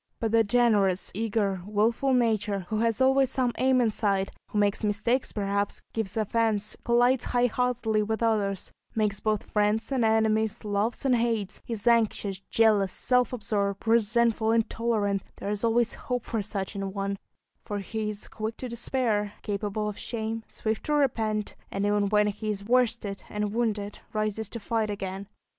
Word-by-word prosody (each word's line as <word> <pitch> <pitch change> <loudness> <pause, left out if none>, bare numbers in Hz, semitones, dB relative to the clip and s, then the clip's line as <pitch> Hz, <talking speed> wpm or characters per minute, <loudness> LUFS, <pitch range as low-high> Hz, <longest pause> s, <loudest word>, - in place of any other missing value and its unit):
But 225 -2 -1
the 225 0 +5
generous, 205 -4 +2
eager, 205 -3 -1
wilful 220 +6 +1
nature, 215 -5 +1
who 215 - -1
has 230 +2 +1
always 265 0 +4
some 255 -2 +1
aim 260 0 +4
in 235 -3 +3
sight, 200 -2 0 0.2
who - - -4
makes 205 0 +2
mistakes 215 +5 +1
perhaps, 200 -1 -1
gives 220 -2 -2
offence, 215 -1 +1
collides 245 +1 +3
high 245 0 +2
heartedly 245 -3 +1
with 220 +1 -1
others, 205 -4 0 0.2
makes 210 -3 0
both 215 -2 -1
friends 210 +4 +1
and 260 -3 +1
enemies, 220 -1 +2
loves 210 +5 -1
and 260 -2 +4
hates, 225 -4 -1
is 225 -3 -4
anxious, 220 -4 +2
jealous, 205 -2 +3
self 250 +3 +2
absorbed, 200 -3 -2
resentful, 225 0 +3
intolerant 220 -3 +1
there 200 - -4
is 210 +1 -3
always 235 0 +2
hope 245 -2 -4
for 225 -3 -2
such 200 -1 -4
an 195 -1 -4
one, 200 0 -2 0.4
for 205 - -4
he 215 +2 -3
is 210 -1 -7
quick 220 +1 -5
to 255 - -5
despair, 230 -3 -1
capable 210 0 -2
of 210 - -5
shame, 225 -1 -3
swift 220 0 -3
to 300 - +1
repent, 220 -7 0
and 195 +1 -2
even 205 -1 +2
when 210 0 +4
he 210 +1 -3
is 200 -1 -3
worsted 230 -4 +1
and 210 0 -2
wounded, 215 -3 -1
rises 215 0 -2
to 230 - -6
fight 220 0 -1
again. 195 -1 -5
215 Hz, 165 wpm, -27 LUFS, 205-230 Hz, 0.4 s, the